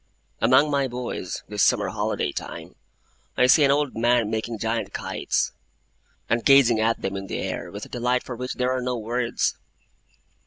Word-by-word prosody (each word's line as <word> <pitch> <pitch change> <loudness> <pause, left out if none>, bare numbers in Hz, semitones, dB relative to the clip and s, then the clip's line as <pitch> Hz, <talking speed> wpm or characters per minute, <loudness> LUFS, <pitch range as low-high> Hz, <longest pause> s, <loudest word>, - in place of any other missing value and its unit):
Among 130 +6 +4
my 140 -1 +1
boys, 120 -7 -5
this 105 -1 -2
summer - - +3
holiday - - -1
time, - - -7 0.6
I 125 - +5
see 135 +4 +6
an 140 - +4
old 145 -1 +1
man 120 -1 +2
making 110 +1 -3
giant 115 +2 -2
kites, - - -1 0.8
and 115 +1 0
gazing 135 -5 +6
at 115 +1 0
them 95 0 -2
in 100 0 -5
the - - -4
air, - - -4
with 100 +1 -7
a - - -15
delight 125 +1 0
for 125 - -6
which 125 +2 -5
there 125 0 0
are 130 - -2
no 125 0 -2
words. 120 +2 -1
120 Hz, 180 wpm, -24 LUFS, 115-125 Hz, 0.8 s, see